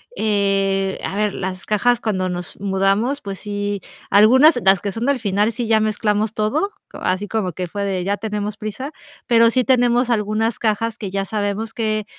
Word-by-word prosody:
Eh, 195 Hz, -, +1 dB
a -, -, -3 dB
ver, 210 Hz, -1 st, 0 dB
las 185 Hz, 0 st, -5 dB
cajas 240 Hz, +3 st, +2 dB
cuando 190 Hz, -5 st, -1 dB
nos 180 Hz, 0 st, -6 dB
mudamos, 195 Hz, +7 st, +1 dB
pues 195 Hz, -1 st, -6 dB
sí, 205 Hz, -1 st, -3 dB, 0.3 s
algunas, 250 Hz, -, +6 dB
las 195 Hz, 0 st, +5 dB
que 200 Hz, -, -3 dB
son 225 Hz, +6 st, -3 dB
del 280 Hz, -2 st, +2 dB
final, 205 Hz, 0 st, +1 dB
sí 240 Hz, +1 st, -3 dB
ya 220 Hz, -1 st, +4 dB
mezclamos 215 Hz, 0 st, 0 dB
todo, 285 Hz, -, 0 dB, 0.2 s
o -, -, -8 dB
así 185 Hz, +3 st, -1 dB
como 200 Hz, -5 st, -2 dB
que 180 Hz, +2 st, -4 dB
fue 200 Hz, +4 st, -4 dB
de: 190 Hz, -2 st, -1 dB
"Ya 200 Hz, +2 st, -1 dB
tenemos 210 Hz, 0 st, -4 dB
prisa". 235 Hz, +7 st, -5 dB, 0.3 s
Pero 230 Hz, -1 st, +5 dB
sí 255 Hz, +2 st, +2 dB
tenemos 245 Hz, -1 st, +3 dB
algunas 215 Hz, +1 st, 0 dB
cajas, 225 Hz, 0 st, -1 dB
que 205 Hz, -, -4 dB
ya 195 Hz, +1 st, -2 dB
sabemos 210 Hz, +2 st, -3 dB
que, 215 Hz, -2 st, -1 dB
210 Hz, 185 wpm, -20 LUFS, 195-225 Hz, 0.3 s, algunas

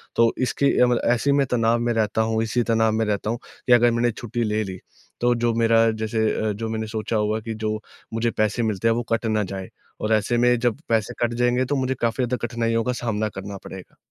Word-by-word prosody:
तो 115 Hz, 0 st, +4 dB
इसकी 130 Hz, +2 st, +1 dB
अ, 125 Hz, -, +7 dB
मतलब 120 Hz, -1 st, +1 dB
ऐसे 130 Hz, +4 st, +1 dB
में 140 Hz, 0 st, +3 dB
तनाव 115 Hz, -1 st, +2 dB
में 120 Hz, 0 st, 0 dB
रहता 110 Hz, -1 st, +1 dB
हूँ 110 Hz, 0 st, 0 dB
इसी 120 Hz, +2 st, 0 dB
तनाव 110 Hz, -1 st, +3 dB
में 110 Hz, +1 st, 0 dB
रहता 105 Hz, 0 st, -1 dB
हूँ 115 Hz, -, -1 dB, 0.3 s
कि 125 Hz, -, +6 dB
अगर 120 Hz, 0 st, +5 dB
मैंने 120 Hz, +1 st, +1 dB
छुट्टी 120 Hz, +1 st, -4 dB
ले 110 Hz, 0 st, 0 dB
ली, 95 Hz, -2 st, -7 dB, 0.4 s
तो 120 Hz, 0 st, +3 dB
जो 120 Hz, 0 st, +1 dB
मेरा 115 Hz, 0 st, +4 dB
जैसे 110 Hz, 0 st, -1 dB, 0.2 s
अ, -, -, +1 dB
जो 110 Hz, +2 st, -4 dB
मैंने 110 Hz, 0 st, -3 dB
सोचा 110 Hz, 0 st, -3 dB
होगा 105 Hz, +1 st, 0 dB
कि 110 Hz, +1 st, -5 dB
जो 110 Hz, 0 st, -2 dB, 0.3 s
मुझे 115 Hz, +1 st, 0 dB
पैसे 110 Hz, +2 st, 0 dB
मिलते 110 Hz, -1 st, 0 dB
हैं 115 Hz, -, +3 dB
वो 120 Hz, -, -1 dB
कट 115 Hz, +1 st, 0 dB
ना 110 Hz, -1 st, +1 dB
जाए। 95 Hz, -1 st, -6 dB, 0.3 s
और 110 Hz, +1 st, +1 dB
ऐसे 110 Hz, +3 st, +1 dB
में 125 Hz, +1 st, +4 dB
जब 120 Hz, +2 st, 0 dB
पैसे 115 Hz, +1 st, +1 dB
कट 120 Hz, 0 st, +1 dB
जाएँगे 125 Hz, +1 st, +2 dB
तो 145 Hz, -, -1 dB
मुझे 130 Hz, -1 st, 0 dB
काफ़ी 115 Hz, +2 st, +1 dB
ज़्यादा 125 Hz, +1 st, -2 dB
कठिनाइयों 115 Hz, -1 st, 0 dB
का 125 Hz, -, 0 dB
सामना 110 Hz, -2 st, -1 dB
करना 100 Hz, 0 st, -7 dB
पड़ेगा। 95 Hz, -1 st, -10 dB
115 Hz, 240 wpm, -23 LUFS, 110-120 Hz, 0.4 s, अ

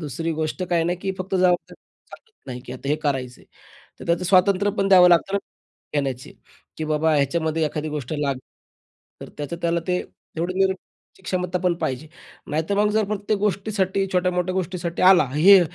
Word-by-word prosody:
दुसरी 165 Hz, +2 st, -3 dB
गोष्ट 155 Hz, +4 st, -2 dB
काय 170 Hz, -1 st, +2 dB
नाही 175 Hz, +1 st, -1 dB
की 190 Hz, -, -1 dB
फक्त 185 Hz, +1 st, -4 dB
जबाबदारी 180 Hz, -1 st, +2 dB
घेऊन -, -, -79 dB
चालत 450 Hz, -1 st, -17 dB
नाही 125 Hz, -2 st, -6 dB
की -, -, -7 dB
आता 130 Hz, +2 st, -7 dB
हे 150 Hz, -, +2 dB
करायचे 130 Hz, -4 st, -2 dB
आहे. -, -, -21 dB, 0.5 s
तर -, -, -9 dB
त्याचं 170 Hz, +2 st, +1 dB
स्वातंत्र्य 190 Hz, +2 st, +3 dB
पण 195 Hz, -, +2 dB
द्यावं 180 Hz, -2 st, +8 dB
लागतं 175 Hz, +2 st, +3 dB
ना, -, -, +3 dB, 0.6 s
घेण्याची 135 Hz, -3 st, -3 dB, 0.4 s
की 160 Hz, -, -3 dB
बाबा 155 Hz, +1 st, +1 dB
ह्याच्यामध्ये 160 Hz, +3 st, 0 dB
एखादी 150 Hz, +1 st, -4 dB
गोष्ट 150 Hz, -3 st, -5 dB
लागली. 140 Hz, -3 st, -1 dB, 0.8 s
तर -, -, -8 dB
त्याचं 150 Hz, +3 st, -4 dB
त्याला 170 Hz, 0 st, +1 dB
ते 180 Hz, -, +2 dB, 0.4 s
एवढं 175 Hz, +3 st, -2 dB
नेण्याची 190 Hz, 0 st, -3 dB
क्षमता 180 Hz, -1 st, -2 dB
पण 180 Hz, -1 st, +3 dB
पाहिजे. 130 Hz, +4 st, -3 dB, 0.4 s
नाहीतर 160 Hz, +6 st, -1 dB
मग 210 Hz, +1 st, +3 dB
जर 220 Hz, 0 st, +3 dB
प्रत्येक 210 Hz, 0 st, -1 dB
गोष्टीसाठी 195 Hz, -1 st, 0 dB
छोट्या-मोठ्या 180 Hz, 0 st, 0 dB
गोष्टीसाठी 180 Hz, -2 st, -3 dB
आला, 185 Hz, -5 st, +7 dB
"हे 190 Hz, +6 st, +8 dB
175 Hz, 180 wpm, -23 LUFS, 155-190 Hz, 0.8 s, द्यावं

